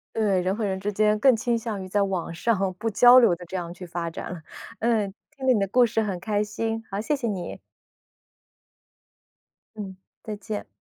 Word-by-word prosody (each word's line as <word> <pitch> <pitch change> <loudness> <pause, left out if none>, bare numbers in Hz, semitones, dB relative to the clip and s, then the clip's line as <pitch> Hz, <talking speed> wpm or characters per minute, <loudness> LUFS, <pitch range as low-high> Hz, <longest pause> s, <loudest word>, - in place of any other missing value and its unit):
对， 200 -4 +2
人 185 +2 0
和 220 - -4
人 190 -2 -1
之 205 +2 -3
间 210 +1 +2
更 260 +1 +6
倾 235 +1 0
向 220 -4 -4
于 185 - -7
在 200 +2 +1
网 185 -4 -2
上 195 -2 0
不 225 - -1
交 245 +4 +8
流 230 -8 +6
地 175 0 -11
这 190 - -5
样 170 -1 -4
去 180 +1 -9
发 170 -1 -4
展。 165 0 -7 0.4
嗯， 220 -4 +1 0.2
听 265 -2 -6
你 250 -4 +5
的 200 - +1
故 245 +3 +5
事 225 0 0
很 195 -4 -3
开 210 +1 0
心， 225 +1 -3
好， 195 - -2
谢 295 +7 0
谢 260 -4 -3
你。 195 -5 -4 2.1
嗯， 195 -3 -7 0.3
再 215 -1 -5
见。 210 +1 -5
210 Hz, 210 characters per minute, -25 LUFS, 190-225 Hz, 2.1 s, 交